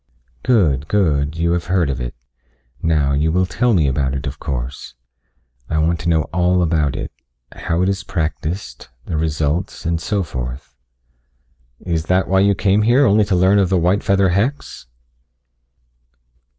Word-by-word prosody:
"Good, 80 Hz, -, +2 dB
good. 75 Hz, -6 st, +1 dB
You 85 Hz, +1 st, +1 dB
have 85 Hz, 0 st, -1 dB
heard 90 Hz, -5 st, +1 dB
of 65 Hz, -2 st, -4 dB
it. -, -, -5 dB, 0.7 s
Now, 75 Hz, -4 st, +1 dB
you 75 Hz, +3 st, +1 dB
will 90 Hz, +2 st, +2 dB
tell 115 Hz, +5 st, +1 dB
me 80 Hz, -5 st, +2 dB
about 65 Hz, 0 st, 0 dB
it, 70 Hz, -, -4 dB
of 70 Hz, +3 st, -5 dB
course. 65 Hz, -2 st, -5 dB, 0.7 s
I 80 Hz, -, -1 dB
want 80 Hz, +2 st, +1 dB
to 85 Hz, -, -2 dB
know 80 Hz, -2 st, +2 dB
all 90 Hz, 0 st, +2 dB
about 80 Hz, -5 st, 0 dB
it -, -, -5 dB, 0.4 s
how 85 Hz, +2 st, -2 dB
it -, -, +1 dB
is 95 Hz, -1 st, -2 dB
practiced, 80 Hz, -4 st, -4 dB, 0.2 s
the 85 Hz, -, -4 dB
results, 80 Hz, +4 st, -2 dB
and 85 Hz, 0 st, -1 dB
so 100 Hz, 0 st, -1 dB
forth." 65 Hz, -3 st, -6 dB, 1.1 s
"Is 85 Hz, -2 st, -1 dB
that 90 Hz, +2 st, +1 dB
why 95 Hz, 0 st, +2 dB
you 100 Hz, +1 st, +3 dB
came 100 Hz, +2 st, +2 dB
here? 120 Hz, +6 st, +4 dB
Only 105 Hz, -1 st, +4 dB
to 95 Hz, -, 0 dB
learn 95 Hz, +3 st, +4 dB
of 95 Hz, -3 st, +2 dB
the 95 Hz, -, +2 dB
white 90 Hz, +4 st, +2 dB
feather 100 Hz, -1 st, +2 dB
hex?" 105 Hz, -, -2 dB
85 Hz, 165 wpm, -19 LUFS, 75-95 Hz, 1.1 s, here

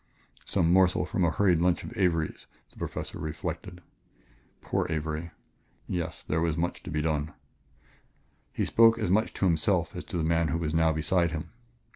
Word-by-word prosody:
Some 85 Hz, +1 st, +2 dB
morsel 95 Hz, -1 st, +4 dB
from 90 Hz, 0 st, -1 dB
a 85 Hz, -, +4 dB
hurried 90 Hz, -2 st, +2 dB
lunch 90 Hz, 0 st, +2 dB
of 120 Hz, -, -8 dB
Avery's, 85 Hz, -6 st, 0 dB, 0.2 s
the -, -, -23 dB
Professor -, -, -5 dB
reflected 85 Hz, +3 st, -5 dB, 0.8 s
poor -, -, -1 dB
Avery! 80 Hz, +1 st, -3 dB, 0.6 s
Yes, 85 Hz, -3 st, -4 dB
there 80 Hz, +1 st, -1 dB
was 85 Hz, -1 st, 0 dB
much 85 Hz, +1 st, -2 dB
to -, -, -9 dB
be 75 Hz, 0 st, -1 dB
done. 75 Hz, -1 st, -1 dB, 1.2 s
He -, -, -1 dB
spoke 115 Hz, 0 st, +5 dB
as 110 Hz, -6 st, -1 dB
much 110 Hz, +3 st, +2 dB
to -, -, 0 dB
himself 80 Hz, -4 st, +1 dB
as -, -, -5 dB
to -, -, -4 dB
the 80 Hz, -, 0 dB
man 80 Hz, 0 st, +2 dB
who 80 Hz, -, 0 dB
was 80 Hz, -2 st, -2 dB
now 80 Hz, -1 st, +3 dB
beside 85 Hz, +3 st, +1 dB
him. 80 Hz, -1 st, -5 dB
85 Hz, 175 wpm, -28 LUFS, 80-90 Hz, 1.2 s, spoke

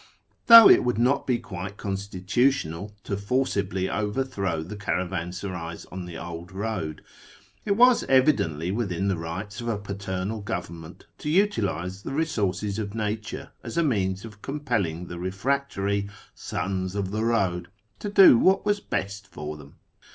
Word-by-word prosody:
Though 230 Hz, -2 st, +12 dB
it -, -, +7 dB
would 125 Hz, -2 st, 0 dB
not 125 Hz, +4 st, +2 dB
be 125 Hz, -2 st, +2 dB
quite 95 Hz, -1 st, -7 dB
con 100 Hz, -, -3 dB
jtitutional 100 Hz, -, 0 dB
to 100 Hz, -, -2 dB
forcibly 100 Hz, -4 st, -1 dB
overthrow 105 Hz, -6 st, -2 dB
the 100 Hz, +6 st, -7 dB
caravansarays 90 Hz, -3 st, -4 dB
on 90 Hz, 0 st, -6 dB
the 85 Hz, -1 st, -8 dB
old 85 Hz, +2 st, -8 dB
:oad, 95 Hz, -7 st, -3 dB, 0.6 s
it 200 Hz, -1 st, +1 dB
was 250 Hz, +1 st, +6 dB
evidently 95 Hz, -, +2 dB
within 100 Hz, -3 st, -1 dB
the 95 Hz, -, 0 dB
rights 95 Hz, +6 st, -5 dB
of 120 Hz, -, -5 dB
a 115 Hz, -3 st, 0 dB
paternal 100 Hz, +1 st, -4 dB
govern 90 Hz, -4 st, -5 dB
t 80 Hz, -, -9 dB
nent -, -, -15 dB, 0.2 s
to 150 Hz, -, -4 dB
utilise 100 Hz, -, 0 dB
the 135 Hz, -, -6 dB
resources 105 Hz, -, -1 dB
of 105 Hz, -1 st, -4 dB
nature 110 Hz, 0 st, -4 dB
as -, -, -7 dB
a 170 Hz, -, +4 dB
means 95 Hz, -8 st, 0 dB
of 105 Hz, -2 st, -12 dB
com 145 Hz, +2 st, -5 dB
nelling 90 Hz, -, -1 dB
the 85 Hz, 0 st, -7 dB
refractory 100 Hz, 0 st, -1 dB, 0.2 s
" -, -, -31 dB
sons 95 Hz, 0 st, -3 dB
of 100 Hz, -2 st, -2 dB
the 110 Hz, +1 st, -1 dB
road 95 Hz, -7 st, +1 dB, 0.2 s
" 105 Hz, -2 st, -41 dB
to 205 Hz, -, -4 dB
do 195 Hz, -, +8 dB
what 190 Hz, +2 st, +3 dB
was 205 Hz, 0 st, +2 dB
best 100 Hz, -, -4 dB
or 75 Hz, +1 st, -5 dB
them. 75 Hz, -1 st, -14 dB
100 Hz, 165 wpm, -26 LUFS, 90-120 Hz, 0.6 s, Though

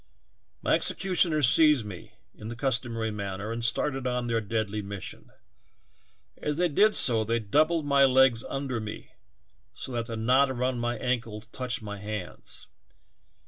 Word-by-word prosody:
My -, -, +2 dB
executioners 170 Hz, -, +2 dB
seized 150 Hz, -5 st, +4 dB
me 95 Hz, -4 st, -10 dB, 0.2 s
in 105 Hz, -, -10 dB
the 120 Hz, -, -6 dB
customary 115 Hz, -3 st, -1 dB
man 100 Hz, -2 st, -4 dB
ner 105 Hz, +3 st, -5 dB
and 115 Hz, 0 st, -4 dB
started 130 Hz, +3 st, 0 dB
on 125 Hz, -1 st, -1 dB
their 115 Hz, -1 st, 0 dB
deadly 110 Hz, 0 st, -2 dB
mission. 100 Hz, -1 st, -8 dB, 1.1 s
As 150 Hz, 0 st, -2 dB
they 175 Hz, 0 st, +2 dB
did 210 Hz, +8 st, +3 dB
so 115 Hz, -3 st, +6 dB
they 115 Hz, +2 st, 0 dB
doubled 155 Hz, +9 st, +1 dB
my 140 Hz, -1 st, +5 dB
legs 130 Hz, -3 st, +4 dB
under 135 Hz, -3 st, -3 dB
me 110 Hz, -1 st, -8 dB, 0.6 s
so -, -, -6 dB
that 120 Hz, -2 st, -3 dB
the 115 Hz, -2 st, -5 dB
knot 130 Hz, +5 st, +3 dB
around 125 Hz, -1 st, -1 dB
my 120 Hz, 0 st, -2 dB
ankles 115 Hz, -4 st, -3 dB
touched 125 Hz, 0 st, -4 dB
my 105 Hz, -1 st, -6 dB
hands. 105 Hz, -3 st, -7 dB
120 Hz, 155 wpm, -27 LUFS, 110-135 Hz, 1.1 s, so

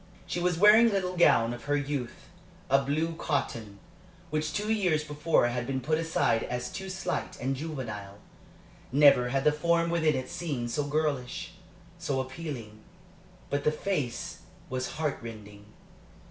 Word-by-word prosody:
She 175 Hz, -, -3 dB
was 175 Hz, -1 st, +1 dB
wearing 210 Hz, +5 st, +8 dB
a -, -, -3 dB
little 185 Hz, -2 st, -1 dB
gown 120 Hz, -9 st, +4 dB
of 120 Hz, -1 st, -9 dB
her 145 Hz, +1 st, +1 dB
youth, 140 Hz, -3 st, -3 dB, 0.4 s
a 135 Hz, 0 st, +6 dB
blue 155 Hz, +4 st, 0 dB
cotton, 115 Hz, -10 st, -2 dB, 0.5 s
which 155 Hz, 0 st, -1 dB
two 210 Hz, +4 st, -1 dB
years 180 Hz, -8 st, +1 dB
before 150 Hz, -1 st, +2 dB
had 120 Hz, 0 st, -3 dB
been 135 Hz, -1 st, -1 dB
put 155 Hz, +5 st, 0 dB
aside 160 Hz, -8 st, +1 dB
as 125 Hz, 0 st, -3 dB
too 190 Hz, -1 st, -6 dB
slight 190 Hz, 0 st, -3 dB
and 135 Hz, +2 st, -1 dB
juvenile. 115 Hz, -10 st, -6 dB, 0.7 s
Never 140 Hz, -3 st, +6 dB
had 135 Hz, +1 st, 0 dB
the 150 Hz, -, +5 dB
form 170 Hz, +2 st, +1 dB
within 160 Hz, -3 st, +2 dB
it 130 Hz, 0 st, -3 dB
seemed 130 Hz, -9 st, -3 dB
so 145 Hz, +3 st, -1 dB
girlish, 145 Hz, -2 st, -2 dB, 0.5 s
so 145 Hz, -6 st, -1 dB
appealing. 130 Hz, -5 st, -6 dB, 0.7 s
But 145 Hz, 0 st, 0 dB
the 150 Hz, -, +3 dB
face 150 Hz, -7 st, -3 dB, 0.3 s
was 130 Hz, 0 st, -2 dB
heart 155 Hz, -2 st, -2 dB
rending. 105 Hz, -3 st, -10 dB
145 Hz, 155 wpm, -29 LUFS, 125-165 Hz, 0.7 s, wearing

